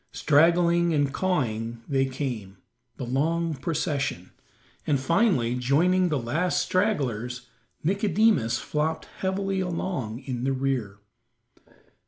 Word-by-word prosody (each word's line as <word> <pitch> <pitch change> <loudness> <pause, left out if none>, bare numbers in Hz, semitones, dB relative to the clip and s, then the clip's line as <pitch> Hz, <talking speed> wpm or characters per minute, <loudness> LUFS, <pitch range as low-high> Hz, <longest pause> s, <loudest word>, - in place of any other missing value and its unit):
Straggling 170 +2 +3
and 145 -2 +1
cawing 115 -10 -1
they 135 -2 +1
came, 120 -8 -5 0.4
the - - -4
long 160 +6 0
procession, 145 - -2 0.6
and 140 -3 +2
finally 140 - +2
joining 170 +9 +2
the 150 - 0
last 155 +9 0
stragglers, 125 - -1 0.4
Nicodemus 195 - +2
flopped 155 +5 -2
heavily 195 0 -1
along 165 - -3
in 125 -2 -4
the 135 +1 +1
rear. 130 -7 -2
145 Hz, 105 wpm, -26 LUFS, 125-175 Hz, 0.6 s, Straggling